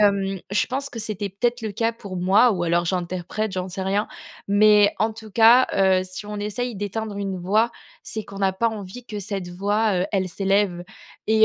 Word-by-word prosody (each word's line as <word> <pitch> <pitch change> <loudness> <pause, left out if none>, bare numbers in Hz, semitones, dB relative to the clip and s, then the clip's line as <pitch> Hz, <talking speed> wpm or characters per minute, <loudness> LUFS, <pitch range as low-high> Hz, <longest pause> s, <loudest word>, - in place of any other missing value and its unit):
hem, 195 -2 +2
je 205 - +2
pense 275 +2 -2
que 235 - -7
c'était 210 -2 -3
peut-être 240 +5 -1
le 215 -2 -4
cas 225 +2 0
pour 200 -5 -8
moi- 195 +6 +4
ou 175 -2 -2
alors 175 0 +1
j'interprète, 185 +4 -2
j'en 185 0 -3
sais 190 +1 -5
rien- 200 +3 0 0.4
mais 205 0 +5
en 220 0 +2
tout 220 -2 -12
cas, 235 +4 +7
heu, 190 -1 +3
si 185 +3 -8
on 210 0 -5
essaye 210 +3 -3
d'éteindre 205 +1 -4
une 195 -2 -3
voix, 215 +6 +2 0.3
c'est 220 - -4
qu'on 195 - -10
n'a 195 -1 +2
pas 230 +5 +1
envie 215 +2 -8
que 210 -3 -6
cette 195 -2 -4
voix, 205 +3 0
heu, - - -1
elle 190 -2 0
s'élève. 195 -2 0 0.4
Et 220 0 +5
205 Hz, 205 wpm, -23 LUFS, 190-220 Hz, 0.4 s, cas